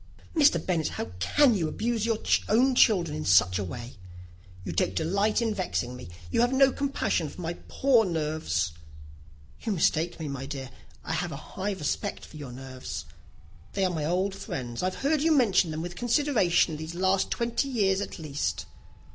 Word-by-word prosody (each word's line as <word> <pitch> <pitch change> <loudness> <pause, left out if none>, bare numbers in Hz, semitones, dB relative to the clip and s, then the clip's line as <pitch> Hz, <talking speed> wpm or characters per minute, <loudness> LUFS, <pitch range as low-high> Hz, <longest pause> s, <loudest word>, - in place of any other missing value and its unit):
"Mr. 295 -2 +5
Bennet, 170 -4 0
how - - -5
can 270 - +4
you 175 -6 0
abuse 230 +5 -1
your 225 -2 +1 0.3
own 255 +5 +4
children 180 -11 +4
in 155 - -4
such 90 0 +4
a - - -1
way? 120 +6 -7 0.7
You - - -3
take 90 +2 0
delight 200 - +1
in 225 -2 0
vexing 125 -10 -2
me. 125 -9 -10 0.2
You - - +2
have 245 +1 +3
no 270 0 +5
compassion 275 - -1
on - - -10
my 170 -1 -3
poor 265 -4 +3
nerves." 155 - -1 0.9
"You 220 - -1
mistake 170 -1 +1
me, 160 - -4
my 135 -1 -5
dear. 135 -3 -6 0.3
I - - -3
have 170 +1 -2
a - - -5
high 190 +7 -4
respect 160 -7 -3
for 155 - -12
your 140 -4 -7
nerves. 130 0 -7 0.7
They 195 - +1
are 180 - 0
my 155 -3 -2
old 185 +4 0
friends. 120 -9 -5
I 185 - +1
have 185 - -3
heard 300 0 +3
you 320 +1 +4
mention 200 -8 +3
them 155 +1 -4
with 175 0 -6
consideration 225 - +2
these 160 +2 -6 0.3
twenty 235 +4 -1
years 200 -6 +2
at - - -5
least." 140 - -3
175 Hz, 180 wpm, -27 LUFS, 145-225 Hz, 0.9 s, Mr